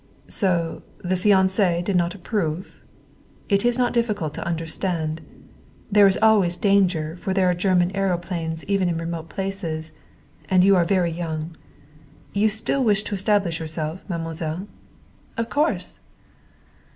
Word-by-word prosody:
"So 175 Hz, -5 st, 0 dB, 0.2 s
the 185 Hz, +1 st, 0 dB
fiance 190 Hz, -2 st, +3 dB
did 195 Hz, +1 st, -1 dB
not 175 Hz, +1 st, +1 dB
approve? 180 Hz, -3 st, -3 dB, 0.7 s
It 200 Hz, -1 st, +2 dB
is 240 Hz, 0 st, +2 dB
not 250 Hz, -1 st, +1 dB
difficult 210 Hz, -10 st, -1 dB
to -, -, -5 dB
understand. 165 Hz, -1 st, -2 dB, 0.7 s
There 205 Hz, -1 st, +7 dB
is 190 Hz, -, +2 dB
always 200 Hz, -6 st, +4 dB
danger, 180 Hz, -6 st, +2 dB
for 190 Hz, +1 st, -3 dB
there 190 Hz, -2 st, +3 dB
are -, -, +1 dB
German 180 Hz, 0 st, +2 dB
aëroplanes 175 Hz, -4 st, -2 dB
even 195 Hz, -3 st, +1 dB
in 170 Hz, -, -1 dB
remote 165 Hz, 0 st, -5 dB
places. 170 Hz, -5 st, -4 dB, 0.6 s
And 185 Hz, -1 st, +5 dB
you 195 Hz, +1 st, +6 dB
are 175 Hz, -2 st, +3 dB
very 180 Hz, -2 st, +1 dB
young. 160 Hz, -1 st, -4 dB, 0.8 s
You 210 Hz, +2 st, +3 dB
still 220 Hz, +5 st, -1 dB
wish 210 Hz, -3 st, +3 dB
to -, -, -4 dB
establish 195 Hz, -4 st, +1 dB
yourself, 160 Hz, +1 st, -4 dB
mademoiselle?" 165 Hz, +1 st, -4 dB, 0.7 s
"Of 230 Hz, 0 st, -2 dB
course!" 300 Hz, +3 st, -1 dB
180 Hz, 140 wpm, -23 LUFS, 165-200 Hz, 0.8 s, There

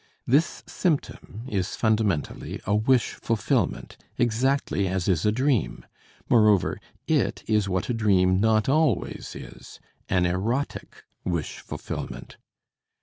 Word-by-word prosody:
This 145 Hz, +7 st, +2 dB
symptom 145 Hz, -, -2 dB
is 95 Hz, -6 st, -2 dB
fundamentally 110 Hz, -8 st, 0 dB
a 100 Hz, -, 0 dB
wish 120 Hz, +4 st, +3 dB
fulfillment, 115 Hz, -3 st, -1 dB, 0.2 s
exactly 120 Hz, -3 st, +1 dB
as 95 Hz, -1 st, -1 dB
is 95 Hz, +1 st, +2 dB
a -, -, +4 dB
dream; 130 Hz, -, 0 dB, 0.4 s
moreover, 105 Hz, -5 st, +4 dB, 0.3 s
it -, -, +1 dB
is 105 Hz, -3 st, +1 dB
what 95 Hz, +2 st, -1 dB
a -, -, 0 dB
dream 95 Hz, -5 st, +3 dB
not 110 Hz, 0 st, +3 dB
always 150 Hz, -, 0 dB
is, -, -, -11 dB, 0.3 s
an 90 Hz, -1 st, +2 dB
erotic 110 Hz, +10 st, -2 dB, 0.2 s
wish 85 Hz, -4 st, -3 dB
fulfillment. -, -, -7 dB
110 Hz, 115 wpm, -25 LUFS, 95-120 Hz, 0.4 s, a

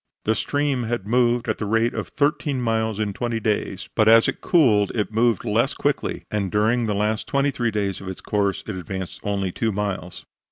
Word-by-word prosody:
The 110 Hz, -, +3 dB
stream 140 Hz, 0 st, -1 dB
had 115 Hz, -4 st, -2 dB
moved 120 Hz, +1 st, +2 dB
at 110 Hz, -, -1 dB
the 105 Hz, -, -2 dB
rate 115 Hz, +2 st, +2 dB
of -, -, -4 dB
thirteen 145 Hz, -2 st, 0 dB
miles 110 Hz, -3 st, 0 dB
in 105 Hz, -2 st, -1 dB
twenty 120 Hz, +1 st, -2 dB
days, 105 Hz, -3 st, -2 dB
but 110 Hz, -1 st, +3 dB
as 115 Hz, 0 st, +7 dB
it -, -, -3 dB
cooled 110 Hz, -, +3 dB
it 105 Hz, -1 st, -1 dB
moved 115 Hz, 0 st, +2 dB
less 115 Hz, +6 st, +1 dB
quickly, 145 Hz, -1 st, -1 dB
and 100 Hz, -3 st, -1 dB
during 110 Hz, +3 st, +2 dB
the 105 Hz, -, 0 dB
last 105 Hz, +2 st, -1 dB
twenty 140 Hz, 0 st, +1 dB
three 120 Hz, -3 st, -1 dB
days 100 Hz, -3 st, -2 dB
of 95 Hz, -, -9 dB
its 95 Hz, -, -6 dB
course, 100 Hz, -2 st, -1 dB
it 110 Hz, -, -4 dB
advanced 95 Hz, 0 st, -6 dB
only 100 Hz, -2 st, -1 dB
two 110 Hz, +4 st, -1 dB
miles. 100 Hz, -3 st, -4 dB
110 Hz, 205 wpm, -23 LUFS, 100-120 Hz, -, as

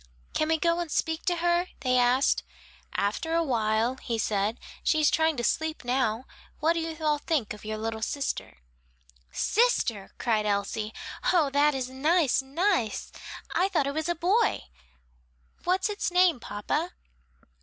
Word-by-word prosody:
"Can 310 Hz, -, +1 dB
we 320 Hz, 0 st, +2 dB
go 335 Hz, +2 st, +1 dB
and 345 Hz, -2 st, -3 dB
speak 320 Hz, +2 st, -1 dB
to 355 Hz, -2 st, +2 dB
her?" 345 Hz, +1 st, +1 dB
they 255 Hz, -1 st, +1 dB
asked. 250 Hz, +2 st, +3 dB, 0.5 s
"After 270 Hz, +11 st, -1 dB
a 335 Hz, -, +3 dB
while," 230 Hz, -2 st, +1 dB
he 235 Hz, -3 st, -3 dB
said, 215 Hz, +1 st, 0 dB, 0.2 s
"she 315 Hz, -, +2 dB
is 300 Hz, -, +4 dB
trying 320 Hz, -2 st, +2 dB
to 240 Hz, -, -2 dB
sleep 315 Hz, +3 st, -1 dB
now. 245 Hz, -1 st, 0 dB, 0.3 s
What 320 Hz, +2 st, +3 dB
do 335 Hz, -, -1 dB
you 325 Hz, -1 st, -4 dB
all 300 Hz, -1 st, +2 dB
think 290 Hz, -9 st, -1 dB
of 210 Hz, -, -11 dB
the 215 Hz, 0 st, -4 dB
little 220 Hz, 0 st, -3 dB
sister?" 275 Hz, -, -3 dB, 0.7 s
"Sister," 245 Hz, -, +1 dB
cried 215 Hz, -3 st, +1 dB
Elsie. 205 Hz, +1 st, -1 dB, 0.4 s
"Oh, 315 Hz, -6 st, +3 dB
that 290 Hz, +1 st, +3 dB
is 260 Hz, -2 st, -2 dB
nice, 295 Hz, +1 st, +2 dB
nice! 270 Hz, -, 0 dB, 0.4 s
I 375 Hz, +2 st, +2 dB
thought 330 Hz, -8 st, +1 dB
it 280 Hz, -, -2 dB
was 315 Hz, +2 st, -2 dB
a 345 Hz, -, +1 dB
boy. 395 Hz, +7 st, +2 dB, 1.0 s
What's 365 Hz, +1 st, +2 dB
its 415 Hz, -2 st, -2 dB
name, 360 Hz, -5 st, +4 dB
papa?" 265 Hz, -, -3 dB
290 Hz, 160 wpm, -27 LUFS, 230-335 Hz, 1.0 s, is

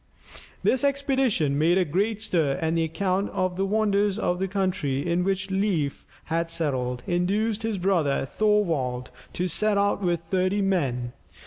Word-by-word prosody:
This 260 Hz, -, +2 dB
expedition 265 Hz, -, +1 dB
made 170 Hz, +4 st, +3 dB
a 185 Hz, -, +3 dB
great 205 Hz, +7 st, -1 dB
stir, 155 Hz, -9 st, +1 dB
and 160 Hz, +1 st, 0 dB
the 165 Hz, -1 st, +2 dB
account 190 Hz, +4 st, -1 dB
of 185 Hz, -2 st, -1 dB
the 195 Hz, +1 st, 0 dB
wonders 205 Hz, -1 st, +1 dB
of 180 Hz, -5 st, 0 dB
the 190 Hz, -, 0 dB
country 175 Hz, -7 st, -1 dB
in 175 Hz, +1 st, +1 dB
which 195 Hz, 0 st, -1 dB
Leif 190 Hz, -8 st, -1 dB, 0.2 s
had 165 Hz, +1 st, -1 dB
settled, 125 Hz, -7 st, -2 dB
induced 200 Hz, +5 st, 0 dB
his 225 Hz, -2 st, -1 dB
brother 175 Hz, -8 st, +1 dB
Thorvald, 160 Hz, -10 st, 0 dB, 0.2 s
to 180 Hz, -, -1 dB
set 210 Hz, +4 st, +1 dB
out 200 Hz, 0 st, +1 dB
with 175 Hz, -3 st, 0 dB
thirty 190 Hz, +2 st, +1 dB
men. 130 Hz, -11 st, 0 dB
185 Hz, 155 wpm, -25 LUFS, 160-205 Hz, 0.2 s, made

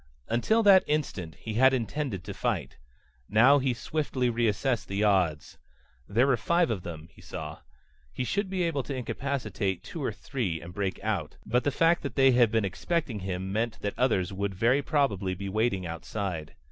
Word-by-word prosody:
Until 220 Hz, -, +2 dB
that 195 Hz, -2 st, +7 dB
instant 105 Hz, -, -2 dB
he 110 Hz, -, -6 dB
had 130 Hz, +4 st, +5 dB
intended 120 Hz, -, -3 dB
to -, -, -6 dB
fight. -, -, -2 dB, 0.5 s
Now 130 Hz, +7 st, +6 dB
he 130 Hz, -1 st, +1 dB
swiftly 130 Hz, -1 st, -1 dB
reassessed 115 Hz, +1 st, 0 dB
the 100 Hz, +2 st, -1 dB
odds. 90 Hz, -7 st, +1 dB, 0.5 s
There 120 Hz, +6 st, +3 dB
were 135 Hz, -3 st, +3 dB
five 170 Hz, +5 st, +2 dB
of 100 Hz, -5 st, -2 dB
them, 80 Hz, -2 st, -8 dB
he -, -, -18 dB
saw. -, -, -7 dB, 0.5 s
He 130 Hz, -, -3 dB
should 200 Hz, -, -1 dB
be 185 Hz, -2 st, -1 dB
able 165 Hz, -5 st, 0 dB
to 135 Hz, +1 st, -5 dB
incapacitate 125 Hz, -7 st, -2 dB
two -, -, -6 dB
or -, -, 0 dB
three 95 Hz, -12 st, -3 dB
and 85 Hz, +3 st, -10 dB
break 95 Hz, 0 st, -2 dB
out. 95 Hz, -8 st, -2 dB
But 125 Hz, +3 st, +1 dB
the -, -, +4 dB
fact 165 Hz, +4 st, +3 dB
that -, -, -5 dB
they 135 Hz, -1 st, +6 dB
had 120 Hz, -2 st, +5 dB
been 110 Hz, -1 st, +1 dB
expecting 130 Hz, -, -2 dB
him 95 Hz, 0 st, -4 dB
meant 115 Hz, +1 st, -1 dB
that 100 Hz, -, -2 dB
others 100 Hz, -8 st, +1 dB
would 100 Hz, 0 st, -2 dB
very 120 Hz, +8 st, +3 dB
probably 105 Hz, -, 0 dB
be 100 Hz, +2 st, -5 dB
waiting 100 Hz, -2 st, 0 dB
outside. 85 Hz, -1 st, -4 dB
115 Hz, 185 wpm, -28 LUFS, 95-135 Hz, 0.5 s, that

